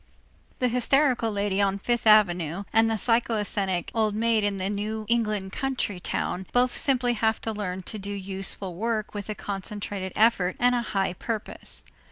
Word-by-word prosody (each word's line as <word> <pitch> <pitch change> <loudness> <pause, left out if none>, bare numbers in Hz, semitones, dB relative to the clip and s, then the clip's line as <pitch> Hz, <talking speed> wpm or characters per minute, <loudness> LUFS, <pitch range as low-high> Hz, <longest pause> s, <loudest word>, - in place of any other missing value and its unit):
The 250 - +2
hysterical 250 -1 +2
lady 200 -1 0
on 195 0 +2
Fifth 240 +3 0
Avenue 180 -4 +4
and 225 0 +4
the 225 - +1
psychasthenic 210 -5 0
old 215 -2 +1
maid 225 -1 +2
in 205 -1 0
the 190 0 -1
New 210 +2 -3
England 215 -5 0
country 255 -8 -2
town 180 +1 -3
both 245 0 +3
simply 250 -3 +3
have 220 -1 +1
to 225 - -2
learn 190 -3 -4
to 215 - -5
do 200 +1 -6
useful 195 -1 -4
work 220 0 -2
with 205 0 -6
a 215 - -2
concentrated 200 -1 -5
effort 205 -5 +3
and 245 0 +4
a 245 - +1
high 195 -5 -1
purpose. 215 +3 -4
210 Hz, 170 wpm, -26 LUFS, 195-230 Hz, -, Avenue